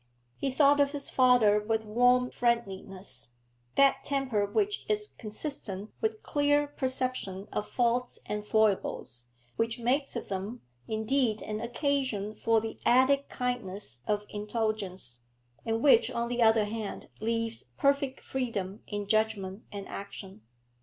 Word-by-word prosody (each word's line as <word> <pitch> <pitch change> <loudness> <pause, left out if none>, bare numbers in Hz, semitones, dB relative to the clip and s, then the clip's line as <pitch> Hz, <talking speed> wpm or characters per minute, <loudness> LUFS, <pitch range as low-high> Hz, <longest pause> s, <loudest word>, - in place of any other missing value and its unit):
He 275 - -1
thought 285 +2 +4
of 285 0 +3
his 285 -1 -2
father 245 -5 +5
with 220 +1 -1
warm 245 +3 +3
friendliness, 195 - -2 0.4
that 275 -1 +4
temper 255 -8 0
which 410 - 0
is 420 0 +2
consistent 215 -3 -5
with 440 0 -1
clear 290 0 +2
perception 255 -8 -3
of 210 - -2
faults 245 0 +1
and 210 0 -3
foibles, 205 - 0 0.3
which 230 +1 0
makes 260 +4 0
of 235 - -4
them, 200 +5 -4 0.3
indeed, 220 +1 +1
an 215 0 -4
occasion 240 -4 -1
for 225 +1 +2
the 225 0 -6
added 265 +3 +4
kindliness 205 - -2
of 210 0 0
indulgence, 205 - -2 0.5
and 225 +1 0
which, 265 -6 +6
on 235 0 -2
the 245 0 -1
other 220 -1 +5
hand, 215 -1 -5
leaves 230 +1 -1
perfect 280 -1 +1
freedom 215 -6 -3
in 205 -1 -3
judgment 215 -1 0
and 200 -1 -6
action. 195 -1 -8
225 Hz, 135 wpm, -29 LUFS, 205-260 Hz, 0.5 s, which